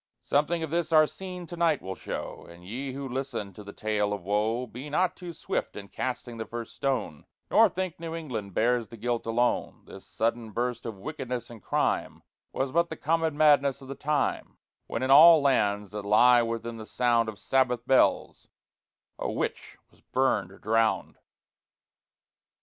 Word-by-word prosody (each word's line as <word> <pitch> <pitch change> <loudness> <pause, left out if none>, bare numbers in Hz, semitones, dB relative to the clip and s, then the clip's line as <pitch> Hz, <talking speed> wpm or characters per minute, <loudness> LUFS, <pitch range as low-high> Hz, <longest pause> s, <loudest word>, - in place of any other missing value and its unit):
Something 160 +4 +1
of 160 - -5
this 170 -1 -1
our 155 -1 +7
scene 180 +2 -7
to 175 - -8
night 165 -4 +2
will 95 - -6
show; - - -7
And 85 +1 -14
ye 130 +7 -5
who 140 0 -5
listen 130 -6 -4
to 105 - -11
the 100 - -9
Tale 105 -1 -1
of 100 -3 -5
Woe, 110 +5 0
Be 125 +5 -9
not 180 +4 +1
too 175 -2 -8
swift 165 - -3
in 100 -1 -8
casting 125 -2 -4
the 110 - -4
first 115 -1 -6
stone, 125 - -2 0.2
Nor 225 -1 +6
think 185 -1 -4
New 165 0 -5
England 115 - -5
bears 120 0 +2
the 115 - -11
guilt 120 +1 -2
alone. 120 +2 0
This - - -12
sudden 115 -1 -2
burst 120 0 -2
of 110 -3 -6
wickedness 120 +4 -5
and 115 -3 -11
crime - - -1 0.3
Was 135 0 -2
but 170 +2 +2
the 160 - -6
common 160 -1 0
madness 140 -3 +4
of 135 -2 -13
the - - -3
time, 145 0 -1 0.3
When 115 - -3
in 130 - +1
all 160 +3 +9
lands, 105 -8 +1
that 105 0 -4
lie 120 +4 +5
within 115 0 -3
the 110 -1 -9
sound 120 -2 +2
Of 105 - -8
Sabbath 125 -1 +1
bells, 130 +1 +2 0.7
a - - -2
Witch - - -4
was - - -26
burned 115 -8 0
or 100 - -14
drowned. 110 +1 0
125 Hz, 180 wpm, -27 LUFS, 110-145 Hz, 0.7 s, all